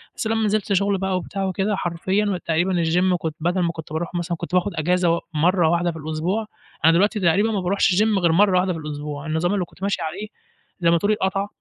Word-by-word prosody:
بس 220 - -3
لمّا 225 -1 +1
نزلت 210 0 0
شغل 200 +1 +2
بقى 190 -1 -1
وبتاع 195 +1 -4
وكده 195 +2 -1
حرفيًا 190 +2 -1
تقريبًا 175 +2 +1
الgym 180 +2 +2
كنت 160 -2 -4
بدل 175 +3 0
ما 170 -1 +1
كنت 160 -2 -9
باروح 170 +3 -3
مثلًا 175 -1 -2
كنت 170 +2 -4
باخد 180 +2 +1
أجازة 175 +2 +1
و - - -4
مَرّة 170 +2 +3
واحدة 170 0 +1
في 165 - -9
الأسبوع، 160 +8 -2 0.4
أنا 165 - +7
دلوقتي 205 +5 +2
تقريبًا 195 +5 +2
ما 205 - 0
باروحش 190 +3 +2
الgym 210 0 +3
غير 170 -2 +3
مَرّة 190 +1 +4
واحدة 185 0 0
في 165 - -6
الأسبوع، 150 -1 -6
النظام 160 +5 0
اللي 185 -3 0
كنت 180 - -16
ماشي 200 -1 -1
عليه 175 +7 -4 0.5
زي 170 - +3
ما 170 - +4
تقولي 205 +5 +1
اتقطع، 195 0 -1
180 Hz, 225 wpm, -22 LUFS, 165-200 Hz, 0.5 s, أنا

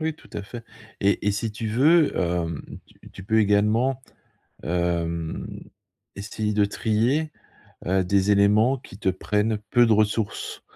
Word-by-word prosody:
Oui, 160 0 -2
tout - - -20
à 105 - -5
fait 115 +4 -9 0.4
et 100 +1 +1
et 105 - +4
si 110 +2 -2
tu 110 +1 -5
veux, 150 +8 +3
hem, 85 -3 -1 0.2
tu - - -24
tu 95 - -11
peux 110 +2 +2
également, 110 +5 +2 0.6
hem, 85 -1 -2 0.7
essayer 105 +2 -3
de 105 0 +3
trier, 115 +9 0 0.6
heu, 95 +1 +1
des 100 +2 +2
éléments 105 +6 +4
qui 100 -6 -14
te 95 - -1
prennent 105 +3 0
peu 120 -1 +5
de 115 - +3
ressources. 105 0 -1
105 Hz, 150 wpm, -24 LUFS, 95-115 Hz, 0.7 s, peu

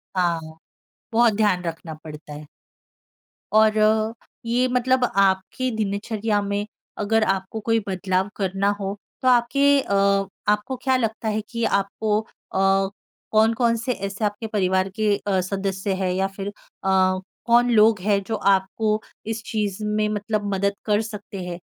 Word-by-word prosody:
हाँ। 165 -3 -1 0.6
बहुत 230 -1 +5
ध्यान 200 -4 +2
रखना 165 -1 -5
पड़ता 150 -1 -9
है। 150 +1 -9 1.1
और 215 0 +5
अ, 215 +1 +3 0.3
ये 245 +2 +2
मतलब 255 +1 +2
आपकी 195 +6 +2
दिनचर्या 210 0 -1
में 200 +1 -2 0.4
अगर 220 +1 +2
आपको 195 +2 -1
कोई 225 +1 +1
बदलाव 185 +1 0
करना 195 0 0
हो 200 +1 -3 0.2
तो 255 - 0
आपके 250 +3 +3 0.2
अ, 200 - -3 0.5
आपको 210 +5 +1
क्या 260 -1 +3
लगता 225 -2 -2
है 215 0 0
कि 235 -1 -3
आपको 210 +2 0
अ, 220 - -19 1.0
कौन-कौन 230 +2 +3
से 230 +3 -2
ऐसे 200 +2 -3
आपके 210 +2 -3
परिवार 190 -2 +1
के 210 -2 +3
अ, 195 -2 0
सदस्य 195 +1 -2
हैं 185 -1 +1
या 190 +1 +1
फिर 195 0 -4
अ, - - -8 0.9
कौन 240 +1 +4
लोग 215 -2 +5
है 200 0 +2
जो 225 - -1
आपको 200 +2 +1 0.3
इस 225 0 -3
चीज़ 210 -2 -2
में 210 0 +1
मतलब 210 -1 -2
मदद 200 +1 0
कर 210 0 +2
सकते 205 -3 -7
हैं? 175 0 -5
210 Hz, 150 wpm, -23 LUFS, 195-225 Hz, 1.1 s, बहुत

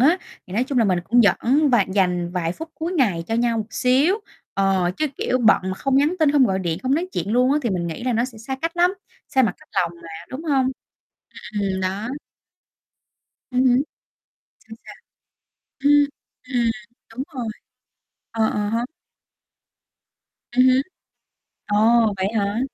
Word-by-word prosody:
á, 320 +8 +4 0.3
thì 185 - -11
nói 230 +6 +1
chung 260 -1 -1
là 230 - +4
mình 185 -4 +2
cũng 240 +4 +4
dẫn 260 - +3
và 230 -5 +4
dành 180 -3 +1
vài 170 -2 -1
phút 320 - -8
cuối 330 +3 -4
ngày 205 - +1
cho 225 - -2
nhau 235 0 +1
một 215 - -3
xíu, 260 - +3 0.4
ờ, 195 -2 +2
chứ, 310 - 0
kiểu, 255 - 0
bận 220 -4 +5
mà 190 0 -3
không 270 +7 0
nhắn 295 +5 +3
tin, 310 -3 +4
không 285 -3 +5
gọi 190 -3 0
điện, 170 -3 -2
không 260 +1 +1
nói 345 +5 -1
chuyện 195 +5 -2
luôn 250 +3 +3
á 295 - +3
thì 235 - 0
mình 175 -2 -1
nghĩ 170 +7 -6
là 255 - +1
nó 230 +1 +1
sẽ 250 -3 -8
xa 265 +4 -5
cách 330 +1 -2
lắm, 355 +2 +3 0.3
xa 265 - +3
mặt 220 -7 +1
cách - - -20
lòng 170 -2 0
mà, 165 - -10 0.2
đúng 265 +5 -7
hông? 275 -4 +2 0.7
Ừm, 210 -2 -6
ừm, 200 - 0
ừm, 190 - -2
đó. 195 +5 -2 1.4
Ừm 250 0 +1
hứm. 250 -1 +5 0.8
Sao, 225 0 -13
sao? - - -11 0.9
Ừm, 290 0 +6 0.5
ừm. 235 -2 +2 0.4
Đúng 255 +4 -4
rồi. 245 -4 -3 0.8
Ờ, 225 -1 +1
ờ 210 0 -1
ha. 230 +2 -1 1.7
Ừm 250 +1 +4
hứm. 260 +1 +4 0.8
Ồ, 205 - 0 0.4
vậy 190 0 0
hả? 205 +1 0
235 Hz, 185 wpm, -22 LUFS, 195-270 Hz, 1.7 s, Ừm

